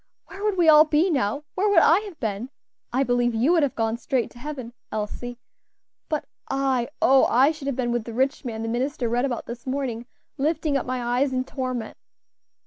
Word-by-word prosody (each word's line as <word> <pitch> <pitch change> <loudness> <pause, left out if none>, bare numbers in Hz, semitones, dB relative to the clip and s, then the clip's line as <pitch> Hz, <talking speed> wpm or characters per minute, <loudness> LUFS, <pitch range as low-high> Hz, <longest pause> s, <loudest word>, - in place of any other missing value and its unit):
where 390 +1 -10
would 420 -2 0
we 345 -2 +3
all 305 -1 +9
be 315 +4 +2
now? 270 -1 0
where 405 +3 +1
would 405 - +2
I - - +6
have 410 -6 -10
been? 220 +2 -3 0.4
I 260 +3 +2
believe 245 -2 +1
you 245 +9 +3
would 345 -2 +4
have 285 -3 0
gone 225 0 0
straight 250 0 -1
to 240 - -15
heaven, 260 -4 -6 0.2
Elsie; 235 +3 -4 0.7
but 305 -2 -1 0.2
I 270 -3 0
oh! 265 0 +6
I 265 +5 +4
should 300 -3 -8
have 275 - -1
been 240 -2 -1
with 240 -2 -1
the 230 - -7
rich 270 +5 0
man 225 -3 -4
the - - -3
minister 250 +2 -1
read 240 +3 +1
about 245 -4 -3
this 235 +2 -8
morning, 255 -3 -3 0.3
lifting 305 0 0
up 270 - -1
my 245 -1 -1
eyes 275 0 +2
in 255 0 0
torment." 255 -4 -4
260 Hz, 210 wpm, -24 LUFS, 240-295 Hz, 0.7 s, all